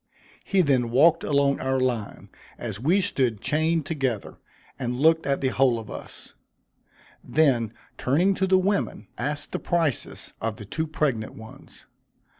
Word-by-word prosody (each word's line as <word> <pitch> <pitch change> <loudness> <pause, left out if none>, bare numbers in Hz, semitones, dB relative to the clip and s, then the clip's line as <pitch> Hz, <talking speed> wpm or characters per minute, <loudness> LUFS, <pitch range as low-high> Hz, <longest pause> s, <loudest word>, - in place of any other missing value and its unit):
He 195 -2 +2
then 130 -7 +2
walked 155 +7 +4
along 140 -1 +2
our 130 0 0
line, 120 -5 -2 0.3
as 110 -4 -5
we 170 - +3
stood 130 - 0
chained 160 +3 +1
together, 135 -9 -3 0.4
and 125 -1 -2
looked 160 +1 +4
at 140 0 0
the 130 - +2
whole 130 -2 +3
of 110 -2 -8
us - - -10 0.9
then 130 -8 +2 0.3
turning 170 +10 +2
to 190 0 0
the 190 0 +5
women, 195 +2 -1
asked 145 0 -3
the - - -2
prices 165 -6 -2
of 115 -1 -2
the 105 - -10
two 160 +10 -3
pregnant 135 -8 -1
ones. 110 0 -13
140 Hz, 150 wpm, -25 LUFS, 120-160 Hz, 0.9 s, the